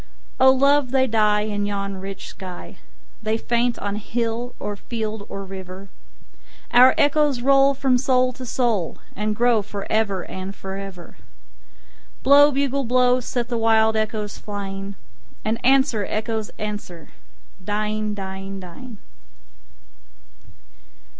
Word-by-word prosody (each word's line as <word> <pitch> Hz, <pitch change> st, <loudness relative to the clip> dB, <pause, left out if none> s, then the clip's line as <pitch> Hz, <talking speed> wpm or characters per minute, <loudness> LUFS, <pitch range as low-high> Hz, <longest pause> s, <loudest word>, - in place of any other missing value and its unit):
O 265 Hz, -, +7 dB
love, 275 Hz, 0 st, +3 dB
they 260 Hz, 0 st, +3 dB
die 215 Hz, -3 st, +2 dB
in 205 Hz, -1 st, -2 dB
yon 200 Hz, -1 st, -3 dB
rich 195 Hz, +1 st, -7 dB
sky, 185 Hz, -2 st, -9 dB, 0.4 s
They 220 Hz, 0 st, 0 dB
faint 240 Hz, +1 st, 0 dB
on 205 Hz, 0 st, -3 dB
hill 235 Hz, +2 st, -3 dB
or 205 Hz, -, -4 dB
field 215 Hz, -1 st, -5 dB
or 195 Hz, -, -5 dB
river:Our 195 Hz, +6 st, -1 dB
echoes 290 Hz, -3 st, +3 dB
roll 275 Hz, +1 st, +5 dB
from 260 Hz, -2 st, +2 dB
soul 255 Hz, -1 st, +2 dB
to 255 Hz, -, -9 dB
soul, 230 Hz, -9 st, 0 dB, 0.2 s
And 210 Hz, +1 st, -1 dB
grow 235 Hz, -1 st, +3 dB
for 200 Hz, 0 st, -6 dB
ever 200 Hz, -4 st, +1 dB
and 190 Hz, +1 st, -7 dB
for 190 Hz, 0 st, -7 dB
ever. 195 Hz, -3 st, -9 dB, 1.1 s
Blow, 285 Hz, +2 st, +7 dB
bugle, 275 Hz, 0 st, 0 dB
blow, 250 Hz, +1 st, +3 dB
set 245 Hz, -1 st, -3 dB
the 240 Hz, -2 st, -2 dB
wild 220 Hz, 0 st, +3 dB
echoes 215 Hz, -1 st, -2 dB
flying, 200 Hz, -1 st, -6 dB, 0.5 s
And 220 Hz, +1 st, -1 dB
answer, 265 Hz, -4 st, +3 dB
echoes, 220 Hz, 0 st, -2 dB
answer, 205 Hz, -6 st, -6 dB, 0.5 s
dying, 210 Hz, +1 st, -2 dB
dying, 195 Hz, 0 st, -6 dB
dying. 200 Hz, +6 st, -10 dB
220 Hz, 125 wpm, -22 LUFS, 200-250 Hz, 1.1 s, O